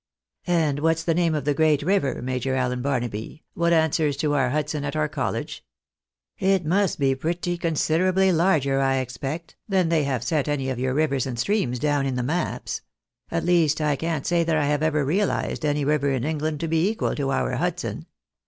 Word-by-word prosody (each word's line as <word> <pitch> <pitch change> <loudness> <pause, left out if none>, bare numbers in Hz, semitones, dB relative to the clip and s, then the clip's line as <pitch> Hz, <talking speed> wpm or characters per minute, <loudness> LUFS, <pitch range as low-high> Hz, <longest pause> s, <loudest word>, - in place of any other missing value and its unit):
" - - -62
And 160 -5 +1
what's 160 +1 +1
the 165 - +1
name 165 -1 +1
of 145 -3 -3
the 145 - +2
great 150 -1 +2
river. 170 -8 0
Major 130 +1 -1
Allen 125 -1 -1
Barnaby, 120 0 -3
what 170 0 +1
answers 160 -3 +2
to 145 0 0
our 135 -3 +2
Hudson 150 +1 -2
at 145 - -3
our 75 - +1
college? - - -4 0.8
It 190 -2 +2
must 190 +4 +1
be 135 -2 +2
pretty 170 +5 -2
considwably 175 +3 +2
larger, 160 -6 +2
I 135 0 +2
expect, 135 +6 -5
than 185 -4 +2
they 165 -2 +2
have 130 -4 -1
set 145 +3 0
any 135 -3 -1
of 125 - -4
your 130 +1 -1
rivers 140 -4 +1
and 125 -2 -4
streams 130 - 0
down 145 0 +1
in 130 - -2
the 125 - -1
maps; 160 +7 -2 0.5
at 165 -1 -2
least 165 -4 +3
I 150 -2 +1
can't 160 -1 -3
say 170 -1 +2
that 165 -1 +1
I 150 - +1
have 145 0 +1
ever 155 -2 +1
realised 185 +2 0
any 145 -1 0
river 145 -1 +2
in 130 -3 -1
England 155 0 -2
to 165 - -1
be 165 +4 +2
equal 225 +1 -1
to 140 -2 -1
our 135 - 0
Hudson. - - -3
150 Hz, 200 wpm, -24 LUFS, 135-165 Hz, 0.8 s, least